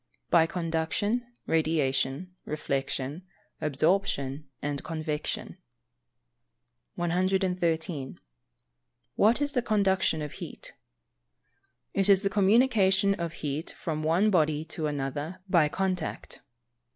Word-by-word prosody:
_ - - -51
By 165 -1 +6
Conduction, 175 +8 -1 0.2
Radiation, 155 +1 0
Reflection, 140 0 -2 0.4
Absorption 150 -2 0
and 145 -1 -3
Convection. 155 +2 -4 1.4
113. 175 -4 0 0.9
What 225 +7 +3
is 290 - 0
the 255 -3 +1
Conduction 195 -8 +2
of 150 - -5
heat? - - -9 1.2
It 195 0 +2
is 195 0 +6
the 195 - +1
communication 200 -1 +4
of 170 -3 -4
heat 145 +3 -2
from 155 -2 -4
one 170 +7 +3
body 155 -3 +2
to 155 -2 -2
another 145 +4 -3
by 170 -5 +4
contact. 185 -1 -3
165 Hz, 100 wpm, -28 LUFS, 150-190 Hz, 1.4 s, By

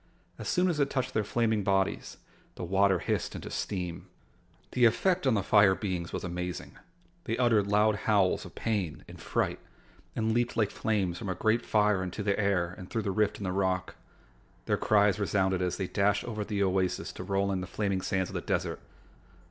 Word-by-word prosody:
As - - -4
soon 180 0 +2
as 165 -4 0
it 140 -1 +2
touched 130 -2 -2
their 110 - +1
flaming 110 0 0
bodies, 95 0 0 0.4
the - - -6
water 95 +1 +3
hissed - - -2
into - - -7
steam. 90 -4 -4 0.6
The 125 -1 +4
effect 175 +9 +2
on 125 - +4
the 100 - 0
fire 100 -2 +5
beings 90 -5 -3
was - - -4
amazing. 90 0 -5 0.5
They 115 - -1
uttered 115 -5 +3
loud 105 +1 +3
howls 100 -4 +3
of - - -12
pain 100 -8 -2
and - - -12
fright - - -1 0.6
and 110 0 0
leaped 120 0 0
like 105 -3 +2
flames 95 -6 -1
from 105 - -5
a 95 - -1
great 110 +2 +1
fire 105 -2 +2
into 95 +3 -4
the 100 0 0
air 95 -4 +1
and 90 - -9
through 115 -2 -2
the 100 - -1
rift 105 +1 +1
in - - -7
the 95 - -1
rock. 95 -1 0 0.7
Their - - +2
cries 105 -1 +3
resounded 95 -2 +1
as 90 -1 -1
they 95 - -2
dashed 100 +2 +1
over 110 -3 -4
the 100 -1 -1
oasis 95 -1 0
to - - -7
roll 100 0 0
in 95 -1 -1
the 90 - -5
flaming 100 -3 -1
sands 95 -1 -1
of - - -11
the - - -2
desert. - - -2
100 Hz, 200 wpm, -29 LUFS, 95-110 Hz, 0.7 s, fire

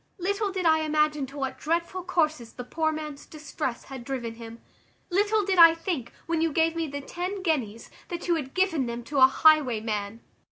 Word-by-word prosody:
Little 400 +2 -1
did 375 -2 -3
I 315 -1 +5
imagine 300 -2 +1
to 275 +3 -11
what 270 -1 -4
dreadful 340 +3 -2
courses 310 -9 -1
the 250 - -7
poor 315 +5 -1
man's 305 -2 -7
distress 290 -5 -5
had 265 -3 -9
driven 240 -3 -4
him. 230 0 -10 0.5
Little 410 +2 +2
did 380 -2 +1
I 330 -1 +9
think, 330 -8 -4
when 330 -1 -1
you 325 -1 +1
gave 325 +2 +1
me 330 -1 -2
the 285 0 -5
ten 365 +6 -5
guineas, 235 - -2 0.2
that 345 0 -6
you 345 - +3
had 285 -5 -4
given 350 -9 +1
them 235 0 -5
to 280 +3 -2
a 260 - +9
highwayman! 230 -8 +2
310 Hz, 195 wpm, -26 LUFS, 260-340 Hz, 0.5 s, I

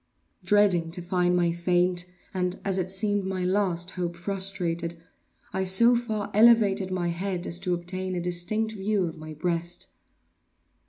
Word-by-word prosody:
Dreading 200 -6 +3
to 180 - +1
find 180 0 +1
my 175 -1 +2
faint, 175 +1 +1 0.3
and, 180 0 -2
as 195 -1 0
it 185 0 -3
seemed, 205 +1 0
my 190 -1 -3
last 185 -2 0
hope 175 -2 -3
frustrated, 175 -2 -2 0.6
I 190 0 0
so 230 +6 +5
far 220 -3 -3
elevated 210 -3 +5
my 180 -2 -1
head 180 +1 -3
as 170 - -2
to 180 -1 -1
obtain 185 +2 -4
a - - -1
distinct 180 +6 -1
view 205 -1 -1
of 165 -2 -5
my 155 0 -8
breast. 170 +2 -3
185 Hz, 155 wpm, -26 LUFS, 175-195 Hz, 0.6 s, so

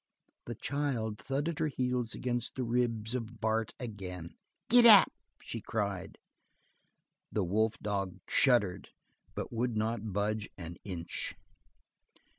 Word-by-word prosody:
The 120 - -5
child 125 -6 -2
thudded 145 +4 -2
her 160 - +2
heels 125 -4 -1
against 120 -1 -2
the 130 - -1
ribs 115 -2 0
of 115 -2 -4
Bart 110 0 0
again. 95 -8 -6 0.3
"Giddap!" 235 -4 +9 0.3
she - - -5
cried. - - -3 1.1
The 105 - 0
wolf 110 +5 +1
dog 100 -3 -2
shuddered 105 -8 +3 0.5
but - - -4
would 120 -1 0
not 110 0 -1
budge 105 +2 -1
an 85 -2 -7
inch. 90 -4 -4
115 Hz, 115 wpm, -32 LUFS, 105-125 Hz, 1.1 s, Giddap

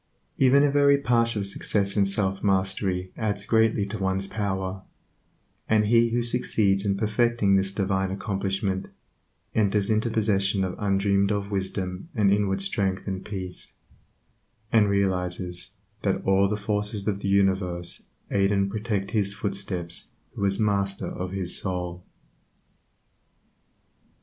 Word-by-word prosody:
Even 135 +2 +5
a 145 - +3
very 140 0 +5
partial 115 -5 +1
success 100 0 -1
in 100 -2 +3
self 95 -1 -1
mastery 95 -2 0
adds 105 -2 -2
greatly 110 -2 +3
to 105 +2 -5
one's 95 0 0
power, 95 -2 -3 0.9
and 110 -1 +4
he 115 +2 +4
who 120 +1 0
succeeds 110 -5 +1
in 100 -2 0
perfecting 110 -1 +2
this 95 0 +1
divine 95 -1 0
accomplishment, 95 0 -2 0.7
enters 105 -1 +2
into 110 +2 +1
possession 100 -3 +1
of 95 -1 -2
undreamed 100 0 +2
of 100 0 -2
wisdom 95 - -3
and 100 -3 +4
inward 100 -1 +1
strength 95 -1 -1
and 95 -1 -3
peace, 95 -3 -6 1.0
and 105 -3 +4
realizes 90 -2 -1 0.3
that - - 0
all 95 +1 +4
the 105 +1 -1
forces 105 0 -2
of 100 -2 0
the 100 - -2
universe 95 -3 +1 0.3
aid 100 0 +2
and 100 -1 +1
protect 105 -2 -2
his 100 -2 0
footsteps 100 -4 -3 0.2
who - - -4
is 100 0 +1
master 100 -2 0
of 90 0 -4
his 95 -1 -2
soul. 90 -2 -4
100 Hz, 135 wpm, -26 LUFS, 95-105 Hz, 1.0 s, Even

